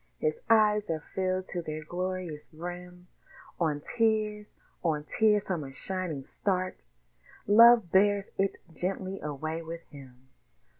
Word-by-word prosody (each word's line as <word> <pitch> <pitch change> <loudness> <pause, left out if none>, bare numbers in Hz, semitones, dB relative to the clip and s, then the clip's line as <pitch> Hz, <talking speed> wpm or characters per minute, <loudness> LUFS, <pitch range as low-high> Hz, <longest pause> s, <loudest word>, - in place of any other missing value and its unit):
His 465 0 -1
eyes 210 -2 +4
are 160 -1 -2
filled 185 0 0
to 175 - -3
their 155 -1 -5
glorious 180 -2 -4
brim; 180 +2 -8 0.5
On 155 -4 0
tears, 215 -2 +1 0.3
on 155 -3 0
tears 210 +5 +2
from 175 -5 -2
a 135 - -8
shining 165 -2 -4
start 185 - -2 0.6
Love 230 -2 +7
bears 200 +1 +3
it 195 0 +1 0.2
gently 190 +3 -3
away 155 +2 -4
with 165 +1 -7
him. 130 -3 -14
185 Hz, 130 wpm, -29 LUFS, 155-205 Hz, 0.6 s, Love